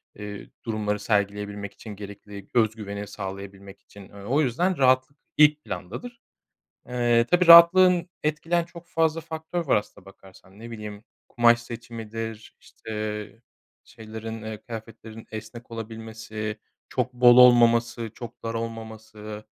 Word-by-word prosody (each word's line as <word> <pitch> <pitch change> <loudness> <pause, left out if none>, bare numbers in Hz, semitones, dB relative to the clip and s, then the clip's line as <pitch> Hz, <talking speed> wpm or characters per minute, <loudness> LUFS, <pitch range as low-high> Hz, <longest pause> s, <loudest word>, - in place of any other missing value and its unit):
eee, 105 -1 -8 0.2
durumları 105 -2 -2
sergileyebilmek 100 -1 -2
için, 105 -2 -10
gerekli 100 0 -10
özgüveni 105 -3 -1
sağlayabilmek 100 0 -8
için. 100 - -15
Eee, - - -18
o 135 +8 +1
yüzden 170 +8 0
rahatlık 130 +2 +3 0.2
ilk 150 0 +5
plandadır. 115 - -7 0.7
Eee, 120 -1 +2
tabii 175 0 +4
rahatlığın 175 +1 +8
etkileyen 165 +3 0
çok 170 0 -13
fazla 165 -1 +1
faktör 160 +2 -5
var 135 - +4
aslına 105 -2 -5
bakarsan. 95 0 -17
Ne 115 +2 -10
bileyim, 105 -1 -8 0.2
kumaş 120 0 +4
seçimidir, 115 -1 -7
işte, 110 +1 -6 0.4
şeylerin, 110 -1 -8
eee, 110 -1 -7
kıyafetlerin 110 -1 -10
esnek 110 +2 -9
olabilmesi, 110 -1 -6 0.3
çok 125 0 -2
bol 120 0 +6
olmaması, 120 -2 +5
çok 120 -2 -10
dar 115 0 -3
olmaması. 110 -2 -7
115 Hz, 125 wpm, -25 LUFS, 105-125 Hz, 0.7 s, rahatlığın